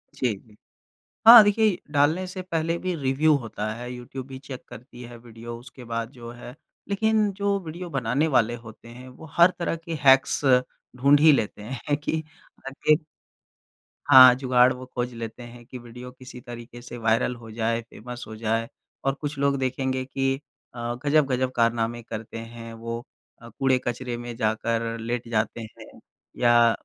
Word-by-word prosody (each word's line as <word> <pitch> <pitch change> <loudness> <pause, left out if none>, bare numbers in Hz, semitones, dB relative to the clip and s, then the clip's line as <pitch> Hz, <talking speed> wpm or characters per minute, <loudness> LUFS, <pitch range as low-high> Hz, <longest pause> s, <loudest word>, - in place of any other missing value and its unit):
जी, 125 -4 0
जी। 105 +2 -19 0.7
हाँ, 230 -2 +12
देखिए 205 -2 +2
डालने 155 +6 +2
से 185 0 -6
पहले 165 -2 -1
भी 185 -1 -2
रिव्यू 145 +2 +2
होता 110 -3 -5
है। 120 +2 -7
यूट्यूब 125 +2 -8
भी 130 -1 -8
चेक 135 -2 -9
करती 125 +1 -12
है 120 0 -10
वीडियो 115 0 -9
उसके 125 +1 -13
बाद 115 0 -3
जो 120 -3 -10
है। 120 +2 -11 0.3
लेकिन 215 0 +2
जो 200 0 +1
वीडियो 170 +2 -7
बनाने 135 +2 0
वाले 120 +1 +2
होते 110 +1 -13
हैं, 125 +2 -11
वो 130 +5 -13
हर 170 +1 +8
तरह 170 - -1
के 165 0 -7
हैक्स 135 0 +5 0.6
ढूँढ 140 +3 +4
ही 155 0 +7
लेते 105 -6 0
हैं 130 +5 -3
कि 160 +1 -3 0.4
आगे 150 +2 +2 1.1
हाँ, 130 -3 +10
जुगाड़ 125 -1 +4
वो 130 0 -9
खोज 125 0 -2
लेते 115 +1 -7
हैं 120 0 -12
कि 125 - -9
वीडियो 125 +1 -10
किसी 130 -1 -12
तरीके 120 0 -10
से 120 0 -9
वायरल 115 +2 +1
हो 115 -2 -12
जाए, 115 +1 -1
फेमस 120 +2 -10
हो 110 - -8
जाए 115 +1 -1 0.4
और 135 - +2
कुछ 145 -1 -4
लोग 140 0 +1
देखेंगे 130 0 -1
कि 135 +1 -1 0.4
अ, 120 0 -3
गजब-गजब 135 -4 +2
कारनामे 115 0 +1
करते 110 0 -7
हैं। 115 0 -9
वो 115 +1 -5 0.4
अ, 115 - -11
कूड़े 130 +3 +1
कचरे 120 0 -3
में 120 -1 -7
जाकर 115 +1 -1
लेट 120 +1 -3
जाते 110 +1 -1 0.2
हैं - - -14 0.4
या 120 -1 +5
125 Hz, 170 wpm, -25 LUFS, 115-140 Hz, 1.1 s, हाँ